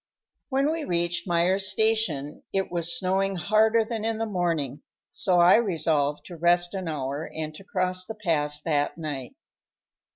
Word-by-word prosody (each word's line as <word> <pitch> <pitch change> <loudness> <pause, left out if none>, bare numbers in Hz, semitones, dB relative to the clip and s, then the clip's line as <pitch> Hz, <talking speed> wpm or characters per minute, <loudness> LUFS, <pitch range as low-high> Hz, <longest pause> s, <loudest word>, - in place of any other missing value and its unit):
When 275 +2 +1
we 325 -1 -2
reached 175 -3 0
Myer's 185 +3 +2
Station 215 -11 0
it 195 -2 -1
was 175 +6 0
snowing 195 -1 0
harder 220 +5 +3
than 220 -1 -4
in 225 0 -1
the 225 - -1
morning, 165 - -1 0.3
so 180 -2 +2
I 175 +4 +7
resolved 160 -9 0
to 175 - -9
rest 175 +2 +3
an 190 -3 -4
hour 145 0 -3
and 155 -1 -5
to 175 - -12
cross 185 -1 -2
the 220 - -6
pass 150 -7 0
that 145 -2 0
night. 150 - -5
175 Hz, 160 wpm, -26 LUFS, 155-210 Hz, 0.3 s, I